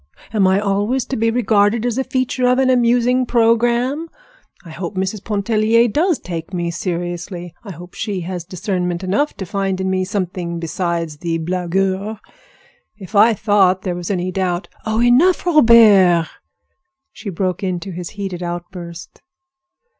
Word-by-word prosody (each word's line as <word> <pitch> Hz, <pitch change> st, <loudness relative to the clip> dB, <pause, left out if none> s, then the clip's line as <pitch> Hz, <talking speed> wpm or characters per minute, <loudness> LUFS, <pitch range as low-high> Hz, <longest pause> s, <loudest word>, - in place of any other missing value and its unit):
Am 200 Hz, -3 st, +3 dB
I 190 Hz, +1 st, +3 dB
always 205 Hz, +5 st, 0 dB
to 270 Hz, -, -4 dB
be 230 Hz, 0 st, +1 dB
regarded 220 Hz, -1 st, +2 dB
as 245 Hz, +1 st, -1 dB
a -, -, +1 dB
feature 255 Hz, -1 st, -1 dB
of 250 Hz, 0 st, +3 dB
an 260 Hz, -1 st, +3 dB
amusing 245 Hz, +1 st, +3 dB
programme? 240 Hz, +6 st, +1 dB, 0.6 s
I 165 Hz, -, -10 dB
hope 175 Hz, +4 st, -6 dB
Mrs. 190 Hz, +2 st, -3 dB
Pontellier 220 Hz, +2 st, +2 dB
does 315 Hz, -, +1 dB
take 165 Hz, -1 st, -7 dB
me 170 Hz, -1 st, -2 dB
seriously. 175 Hz, 0 st, -4 dB
I 210 Hz, -, -10 dB
hope 175 Hz, +1 st, -11 dB
she 205 Hz, -4 st, -3 dB
has 175 Hz, 0 st, -5 dB
discernment 180 Hz, 0 st, -3 dB
enough 205 Hz, +11 st, 0 dB
to 190 Hz, -, -5 dB
find 195 Hz, 0 st, -2 dB
in 190 Hz, 0 st, -1 dB
me 185 Hz, 0 st, 0 dB
something 180 Hz, -3 st, -3 dB
besides 170 Hz, -2 st, -3 dB
the 165 Hz, +1 st, -2 dB
blagueur. 190 Hz, +4 st, -2 dB, 0.8 s
If 200 Hz, 0 st, -10 dB
I 220 Hz, +3 st, +6 dB
thought 190 Hz, -3 st, +2 dB
there 185 Hz, -, -2 dB
was 175 Hz, -1 st, -5 dB
any 185 Hz, -2 st, -1 dB
doubt—" 185 Hz, -1 st, -2 dB, 0.2 s
"Oh, 220 Hz, +2 st, +1 dB
enough, 280 Hz, +12 st, +4 dB
Robert!" 220 Hz, -, +6 dB, 0.9 s
she 215 Hz, -, -8 dB
broke 185 Hz, +1 st, -2 dB
into 185 Hz, -1 st, -3 dB
his 175 Hz, -1 st, -6 dB
heated 190 Hz, -3 st, -4 dB
outburst. 175 Hz, -1 st, -7 dB
195 Hz, 155 wpm, -18 LUFS, 175-230 Hz, 0.9 s, I